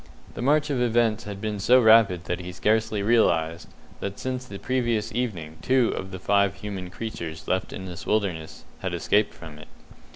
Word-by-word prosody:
The - - -6
march 150 +3 +2
of 130 -3 0
events 115 -1 +2
had 100 -1 -6
been 105 -1 -3
so 125 +6 +5
rapid 110 -7 +5
that 90 0 -3
he 90 0 -6
scarcely 105 +2 +1
realized 85 -8 +2 0.3
that 100 0 -5
since 130 0 -4
the 100 - -7
previous 120 -1 -1
evening 90 -10 -3
two 130 -2 +3
of 95 - -5
the 95 - -6
five 100 +1 +2
human 100 -2 -6
creatures 85 -6 -6
left 95 0 -1
in 95 - -6
this 90 -2 -8
wilderness 95 -7 -2
had 95 -2 -3
escaped 105 +4 +1
from 80 -3 -11
it. 75 - -12
100 Hz, 185 wpm, -25 LUFS, 90-115 Hz, 0.3 s, so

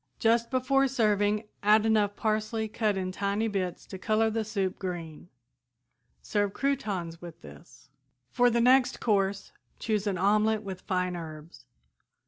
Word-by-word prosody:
Just 230 0 +2
before 270 +1 +2
serving 210 -4 +1 0.2
add 215 +1 +4
enough 210 -2 +2
parsley 220 +1 -1
cut 215 -2 -1
in 185 -1 -2
tiny 200 +3 -1
bits 190 -4 -3
to 190 - -9
color 220 +2 +1
the 225 0 -1
soup 195 -3 -2
green. 175 -3 -6 0.9
Serve 205 -2 0
croutons 200 -12 -2
with 170 -2 -10
this. 75 -1 -15 0.4
"For 245 0 +4
the 235 0 +1
next 255 +1 +4
course 200 -3 0 0.3
choose 215 -2 -1
an 195 -2 0
omelette 215 +3 +2
with 190 -2 -7
fine 180 -2 -1
herbs. 160 -1 -9
210 Hz, 140 wpm, -28 LUFS, 185-225 Hz, 0.9 s, add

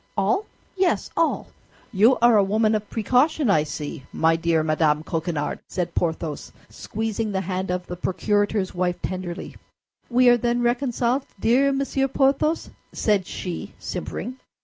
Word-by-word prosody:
"All?" 220 - +1 0.3
"Yes, 375 -2 +1
all." 330 - +1 0.5
"You 220 +5 +5
are 240 -1 +7
a 205 - +5
woman 215 +2 +2
of 210 -1 -2
precaution, 255 +3 +2
I 155 - +4
see, 150 -1 -5
my 165 0 +3
dear 165 -1 +1
Madame 155 -1 +2
Coquenard," 160 -2 -2
said 175 -2 -3
Porthos, 160 -3 -2 0.2
squeezing 220 0 -3
the 190 - 0
hand 185 0 -3
of 180 0 -2
the 180 - -6
procurator's 205 +2 0
wife 180 0 -1
tenderly. 185 -1 -5 0.5
"We 250 +1 +4
are 240 - +6
then 240 +1 0
reconciled, 245 +1 0
dear 260 +7 +3
Monsieur 270 0 0
Porthos?" 275 +4 +1 0.2
said 200 -4 +1
she, 180 -2 -6
simpering. 255 +2 -5
205 Hz, 145 wpm, -24 LUFS, 175-245 Hz, 0.5 s, are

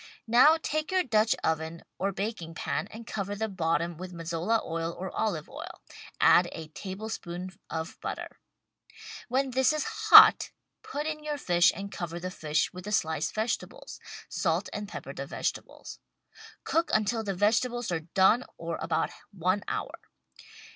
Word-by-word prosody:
Now 250 +8 +6
take 310 0 -2
your 370 -1 +3
Dutch 220 -5 +2
oven 160 +1 -2 0.2
or 195 +2 0
baking 195 -4 -4
pan - - -2
and 225 +1 -10
cover 205 -2 -4
the 220 +2 -2
bottom 170 -3 -1
with 185 +1 -8
Mazola 170 +6 0
oil 165 0 -2
or 190 0 -5
olive 180 -9 -1
oil 320 +6 -9 0.3
— - - -19 0.2
add 175 0 -2
a 160 -2 -8
tablespoon 185 0 -6 0.2
of 160 +1 -5
butter. - - -6 0.9
When 260 +2 0
this 260 +2 +3
is 305 0 -1 0.2
hot - - +10 0.3
put 305 -9 -4
in 305 -1 -4
your 300 -1 -3
fish 175 -8 +4
and 200 +1 -6
cover 170 -1 -5
the 185 +1 -5
fish 155 -2 -1
with 180 0 -9
the 210 - -5
sliced 160 -6 0
vegetables. 220 +2 -3 0.3
Salt 175 +1 -1
and 210 0 -4
pepper - - -7
the - - -6
vegetables. - - -5 0.6
Cook 330 +1 +1
until 220 +1 +1
the 200 -2 -3
vegetables 225 +3 +1
are 170 - 0
done 190 +8 +3
or 170 0 -4
about - - -1 0.2
one 185 +1 0
hour. - - -3
195 Hz, 160 wpm, -28 LUFS, 170-230 Hz, 0.9 s, hot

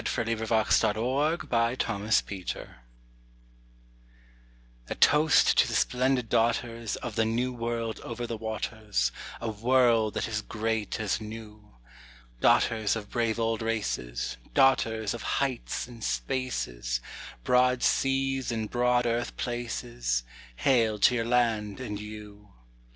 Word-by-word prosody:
TO 120 - -1
THE 115 - -2
WOMEN 110 0 -4
OF 110 - -7 0.9
AUSTRALIA 110 - -1 2.1
A - - -2
toast 150 0 +5
to - - +5
the - - -3
splendid 125 -1 +1
daughters 115 -1 0
Of 120 -3 -6
the 110 - +2
New 120 +3 0
World 115 -1 -3
over 120 0 -5
the 115 - -4
waters, 110 - -2 0.3
A 115 - -3
world 115 -1 +3
that - - -1
is 110 -2 -2
great 110 -1 -2
as 110 0 -1
new; 105 - -10 0.6
Daughters 110 - +3
of 105 -2 -7
brave 115 -1 0
old 115 0 0
races, 65 - -2 0.2
Daughters 110 -6 +3
of 120 - -6 0.2
heights 130 -4 -2
and 115 -2 -11
spaces, - - -2 0.4
Broad 125 - +3
seas 135 -1 +1
and 110 -2 -3
broad 125 0 +2
earth 120 +1 -1
places— 120 - -2 0.3
Hail 115 - +2
to 115 - +5
your 115 -2 0
land 115 -4 +1
and 105 -5 -5
you! 105 - -10
115 Hz, 125 wpm, -28 LUFS, 105-120 Hz, 2.1 s, toast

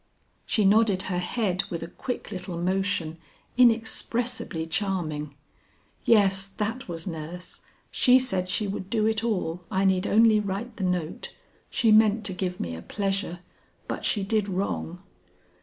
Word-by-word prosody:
She 215 -4 +2
nodded 200 -1 +4
her 180 -2 -2
head 185 0 -1
with 170 -1 -4
a - - -5
quick 245 +7 -5
little 180 -3 -5
motion 175 -3 -1 0.4
inexpressibly 230 -6 +1
charming. 160 -6 -2 0.7
"Yes, 195 -3 +4
that 225 +5 -2
was 165 -2 -6
nurse. 170 0 -7 0.3
She 250 0 +5
said 190 -8 -1
she 210 +2 0
would 195 -1 -5
do 215 0 +1
it 220 0 +1
all, 180 -7 -1
I 190 +1 +1
need 190 0 +2
only 220 0 +5
write 205 +4 -4
the 200 - -3
note. 180 -3 -3 0.3
She 235 -4 +2
meant 215 0 +5
to 195 - 0
give 180 0 -3
me 85 -1 -3
a 80 - -8
pleasure, 195 -3 -2 0.5
but - - -4
she 205 - +1
did 205 0 0
wrong." 180 -2 -3
195 Hz, 150 wpm, -26 LUFS, 180-220 Hz, 0.7 s, She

